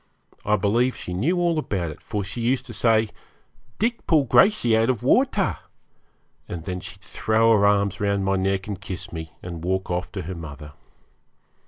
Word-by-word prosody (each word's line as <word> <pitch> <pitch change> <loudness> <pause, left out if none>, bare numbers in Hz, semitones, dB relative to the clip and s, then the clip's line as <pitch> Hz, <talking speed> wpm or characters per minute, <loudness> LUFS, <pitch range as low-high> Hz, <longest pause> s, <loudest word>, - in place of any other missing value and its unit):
I 105 - +2
believe 115 +6 +1
she 90 - -6
knew 140 - +1
all 170 -2 +2
about 90 - -2
it, 75 - -12
for 105 -2 -3
she 100 +5 -5
used 125 +2 +1
to 120 - -9
say, 110 -1 +2 0.7
'Dick 230 +1 -1
pull 155 -4 +4
Gracey 125 - +4
out 115 +2 +3
of 125 -5 0
water;' - - +2 0.9
and 85 -2 -6
then 90 -1 -3
she'd 95 +2 -10
throw 110 +3 +2
her 100 -1 +4
arms 100 -1 +2
round 100 -1 +1
my 95 0 +2
neck 95 0 0
and 100 -2 -6
kiss 95 -4 -6
me, 80 -1 -7
and 85 -2 -7
walk 95 +1 -1
off 90 0 -2
to - - -4
her 90 +4 -5
mother. 75 -3 -9
100 Hz, 185 wpm, -24 LUFS, 90-115 Hz, 0.9 s, pull